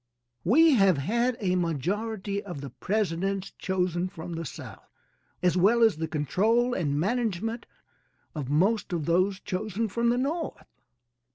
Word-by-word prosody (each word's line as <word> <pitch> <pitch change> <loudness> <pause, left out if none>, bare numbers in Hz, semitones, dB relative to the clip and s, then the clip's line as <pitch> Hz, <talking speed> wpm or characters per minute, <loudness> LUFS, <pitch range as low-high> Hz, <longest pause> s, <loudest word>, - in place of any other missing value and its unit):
We 315 - +6
have 195 - +4
had 235 - 0
a 185 -4 0
majority 195 - -2
of 175 -9 -7
the 140 -3 -7
presidents 195 - -1
chosen 180 -1 -1
from 170 0 -8
the 165 0 -4
South - - -10 0.5
as 180 -1 +3
well 215 +6 +4
as 220 -8 +4
the 160 0 -2
control 220 - +1
and 145 -8 0
management 225 +2 -1 0.7
of 145 -5 -5
most 190 +7 +1
of 165 -4 -1
those 185 +4 +2
chosen 215 +3 -2
from 235 +3 0
the 240 - +2
North. 310 +5 -3
195 Hz, 145 wpm, -27 LUFS, 170-225 Hz, 0.7 s, We